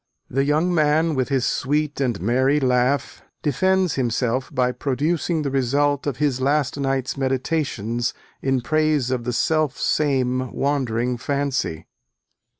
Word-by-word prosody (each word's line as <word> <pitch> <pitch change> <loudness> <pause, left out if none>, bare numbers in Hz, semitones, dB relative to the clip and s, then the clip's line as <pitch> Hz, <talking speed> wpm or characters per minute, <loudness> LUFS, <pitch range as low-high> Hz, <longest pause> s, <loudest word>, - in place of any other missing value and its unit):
The 135 +2 +1
young 155 +5 +1
man, 155 0 +2
with 130 -3 -1
his 135 -3 +1
sweet 145 +1 -1
and 120 -6 0
merry 130 +8 +2
laugh, 125 0 +1 0.2
defends 185 +4 +2
himself 125 0 -1
by 125 -3 +1
producing 155 +5 -1
the 140 - -2
result 140 +2 +1
of 135 -4 -2
his 140 -3 0
last 140 0 +1
night's 135 -1 -1
meditations, 130 -4 -1 0.3
in 135 -1 +1
praise 155 -2 +1
of 125 -2 -2
the 125 - -1
selfsame 130 -3 +1
wandering 125 -3 -1
fancy. 140 - -2
135 Hz, 130 wpm, -22 LUFS, 125-150 Hz, 0.3 s, man